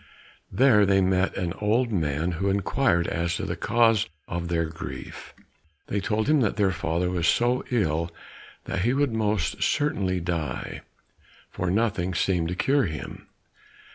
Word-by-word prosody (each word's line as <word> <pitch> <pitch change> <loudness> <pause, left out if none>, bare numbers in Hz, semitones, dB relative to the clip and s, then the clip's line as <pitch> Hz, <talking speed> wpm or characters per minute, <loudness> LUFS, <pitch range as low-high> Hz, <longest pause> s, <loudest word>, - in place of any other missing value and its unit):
There 120 -6 +5
they 100 -1 +4
met 95 0 +1
an 90 -3 -2
old 115 +4 +2
man 80 -2 0
who 95 +4 -1
inquired 100 -1 +1
as 85 0 -1
to - - -3
the - - -3
cause 115 -2 +2 0.2
of 85 0 -3
their 85 -1 0
grief. 80 0 -8 0.5
They 100 - 0
told 110 +2 -1
him 150 -2 +4
that 110 - +1
their 100 -3 +2
father 85 +1 -1
was 85 -2 0
so 120 +5 +2
ill 85 -8 0 0.6
that 95 - -2
he 120 +6 +1
would 140 -4 +1
most 105 -7 -1
certainly 100 -11 +1
die, 80 -6 -4 0.7
for 90 - -2
nothing 95 -3 0
seemed 90 -2 +1
to 90 - -3
cure 135 +4 +2
him. 75 -4 -7
95 Hz, 155 wpm, -25 LUFS, 85-110 Hz, 0.7 s, There